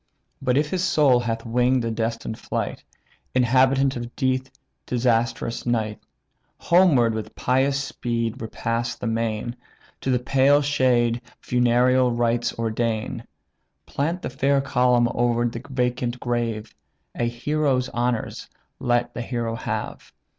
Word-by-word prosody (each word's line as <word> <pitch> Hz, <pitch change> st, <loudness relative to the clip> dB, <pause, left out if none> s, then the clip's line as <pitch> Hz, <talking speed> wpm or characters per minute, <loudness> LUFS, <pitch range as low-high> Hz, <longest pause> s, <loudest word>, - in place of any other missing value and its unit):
But 130 Hz, -1 st, +1 dB
if 150 Hz, +1 st, +1 dB
his 185 Hz, -1 st, 0 dB
soul 145 Hz, -8 st, +4 dB
hath 115 Hz, -1 st, -3 dB
wing'd 125 Hz, +2 st, +2 dB
the 115 Hz, -, -1 dB
destined 115 Hz, 0 st, -3 dB
flight, -, -, -4 dB, 0.5 s
Inhabitant 130 Hz, +2 st, +3 dB
of 120 Hz, 0 st, -6 dB
deep 130 Hz, -1 st, 0 dB, 0.4 s
disastrous 115 Hz, -1 st, 0 dB
night; 110 Hz, -3 st, -1 dB, 0.6 s
Homeward 160 Hz, -11 st, +4 dB
with 110 Hz, -1 st, -5 dB
pious 135 Hz, +2 st, +1 dB
speed 115 Hz, -4 st, -3 dB
repass 115 Hz, +1 st, -2 dB
the -, -, -7 dB
main, 115 Hz, +1 st, -2 dB, 0.4 s
To -, -, -3 dB
the 125 Hz, -, +3 dB
pale 135 Hz, +3 st, +3 dB
shade 125 Hz, -4 st, +2 dB, 0.2 s
funereal 125 Hz, +1 st, +3 dB
rites 120 Hz, 0 st, +1 dB
ordain, 115 Hz, -1 st, -2 dB, 0.6 s
Plant 165 Hz, +6 st, -2 dB
the -, -, -3 dB
fair 135 Hz, +2 st, +2 dB
column 125 Hz, -3 st, +3 dB
o'er 120 Hz, 0 st, +1 dB
the 115 Hz, 0 st, -5 dB
vacant 125 Hz, -1 st, -1 dB
grave, 115 Hz, -3 st, -2 dB, 0.4 s
A 120 Hz, -, -1 dB
hero's 130 Hz, +2 st, 0 dB
honours 120 Hz, -1 st, -2 dB, 0.3 s
let 120 Hz, 0 st, 0 dB
the 120 Hz, -, -4 dB
hero 115 Hz, -1 st, -3 dB
have. 115 Hz, -, -5 dB
120 Hz, 125 wpm, -24 LUFS, 115-130 Hz, 0.6 s, soul